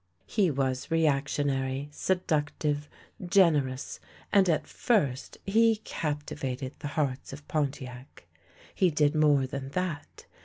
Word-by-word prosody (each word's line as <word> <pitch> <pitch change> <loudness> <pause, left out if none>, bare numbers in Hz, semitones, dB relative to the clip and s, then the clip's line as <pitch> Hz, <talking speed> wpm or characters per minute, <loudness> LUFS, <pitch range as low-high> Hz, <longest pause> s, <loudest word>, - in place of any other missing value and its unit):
He 190 - +2
was 130 -2 -1
reactionary, 140 -3 0
seductive, 150 -4 -1 0.3
generous, 160 -9 +2 0.3
and 195 -3 +5
at 160 - +1
first 145 - 0
he 225 +3 +4
captivated 145 -8 -4
the - - -4
hearts 135 -3 -1
of 145 +1 -10
Pontiac. 130 - -4 0.5
He 185 - +3
did 150 -1 +2
more 150 -3 +4
than 135 +1 -5
that. 170 -5 -4
145 Hz, 110 wpm, -29 LUFS, 135-165 Hz, 0.5 s, and